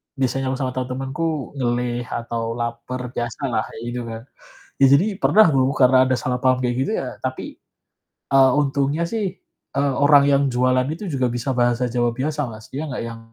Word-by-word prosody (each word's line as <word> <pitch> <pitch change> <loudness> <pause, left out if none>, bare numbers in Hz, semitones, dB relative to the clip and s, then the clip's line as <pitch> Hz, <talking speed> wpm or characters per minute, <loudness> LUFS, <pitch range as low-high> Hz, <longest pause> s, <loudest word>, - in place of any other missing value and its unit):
biasanya 135 0 -1
aku - - -3
sama 130 - 0
temen-temenku 135 +4 -3
ngelih 120 -1 -1
atau 115 -1 -3
lapar, 120 +1 -4
biasalah, 120 +2 -2
kayak - - -10
gitu 125 0 -4
kan. 115 0 -6 0.6
Ya - - +9
jadi 185 - +1 0.2
pernah 215 +1 +6
dong 135 -3 +2
karena 130 0 +6
ada - - +4
salah 125 0 -1
paham 130 -1 +3
kayak 125 -1 0
gitu - - -3
ya - - -5
tapi, - - -4 0.8
eee, 135 -1 +5
untungnya 140 +2 +1
sih, 225 +1 -2 0.5
eee, 140 0 +1
orang 145 -1 +7
yang 140 0 +3
jualan 130 +1 +2
itu 195 +5 -7
juga 130 -4 0
bisa 120 +2 -3
bahasa 120 0 +2
Jawa 120 0 +1
biasa 150 +4 -2
Mas 110 0 -11
dia 140 +4 -4
nggak 130 - -4
yang, 115 0 -8
130 Hz, 180 wpm, -21 LUFS, 120-140 Hz, 0.8 s, Ya